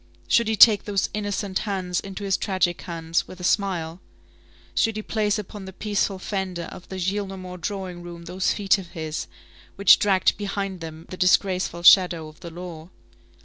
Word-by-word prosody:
Should 235 -2 +3
he 220 - +1
take 215 -1 +7
those 200 -2 0
innocent 205 -2 -2
hands 185 -4 -2
into 195 +1 -7
his 195 -2 +1
tragic 185 -3 0
hands, 165 -1 -2
with 185 - -11
a - - -8
smile? 180 -3 0 0.7
Should 225 -1 +1
he 215 - -4
place 210 -1 0
upon 205 -1 -7
the 190 - -9
peaceful 205 0 -1
fender 185 -3 -4
of 180 - -12
the 190 - -6
Gillenormand 185 -1 -4
drawing 185 -2 -4
room 170 -1 -9
those 185 +2 0
feet 200 -1 +2
of 180 -3 -11
his, 155 -1 -4 0.5
which 200 - +7
dragged 195 -2 +3
behind 195 -2 -3
them 160 0 -8
the 185 - -7
disgraceful 180 -1 +2
shadow 175 -3 +6
of 155 +1 -15
the 175 -2 -8
law? 170 -1 -9
185 Hz, 175 wpm, -24 LUFS, 175-200 Hz, 0.7 s, take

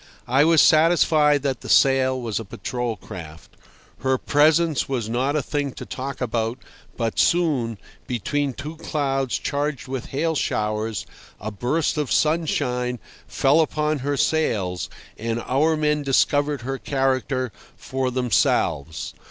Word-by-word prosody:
I 135 +4 +4
was 165 -1 +6
satisfied 155 -3 +4
that 135 -3 -1
the - - -8
sail 130 -1 +4
was 115 -4 -2
a - - -5
patrol 120 +3 -4
craft. 80 -6 -10 0.5
Her 130 0 +1
presence 155 +2 +2
was 125 -5 -2
not 130 +5 0
a 150 - +1
thing 145 -3 -2
to - - -8
talk 135 +1 -6
about, 115 0 -1 0.4
but 115 -2 -1
soon, 145 -11 +2 0.3
between 135 +4 -1
two 150 +5 -7
clouds 135 -5 -1
charged 145 -2 -2
with 130 -2 -4
hail 160 +4 -1
showers, 110 - -1 0.3
a 110 - -5
burst 135 +9 0
of 145 -4 -2
sunshine 135 -6 +1 0.3
fell 145 +4 +3
upon 155 -1 0
her 140 +2 -1
sails, 105 - 0 0.3
and 115 +1 -2
our 155 +5 +2
men 150 -1 +1
discovered 145 0 +2
her 135 +2 -4
character 130 -2 0 0.3
for 130 -1 -2
themselves. 85 - 0
135 Hz, 135 wpm, -23 LUFS, 120-150 Hz, 0.5 s, was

